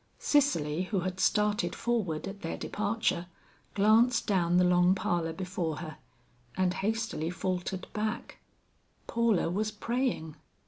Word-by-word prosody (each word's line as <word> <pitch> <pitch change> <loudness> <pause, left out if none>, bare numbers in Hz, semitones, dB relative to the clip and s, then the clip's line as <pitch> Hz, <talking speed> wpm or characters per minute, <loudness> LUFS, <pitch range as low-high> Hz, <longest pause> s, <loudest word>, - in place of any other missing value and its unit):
Cicely 180 - +2
who 190 -1 -1
had 185 +1 -3
started 210 +2 +2
forward 195 -10 -1
at 200 +1 -8
their 165 - -4
departure, 205 -4 -1 0.5
glanced 225 +4 +4
down 175 -3 +2
the 180 - +5
long 180 +1 +4
parlor 170 -3 -1
before 180 -3 -3
her, 155 -3 -7 0.6
and 185 -1 +2
hastily 220 -6 -2
faltered 180 +1 -3
back; 215 +2 -3 0.7
Paula 230 -5 +2
was 210 +4 0
praying. 225 - -2
190 Hz, 125 wpm, -30 LUFS, 175-220 Hz, 0.7 s, the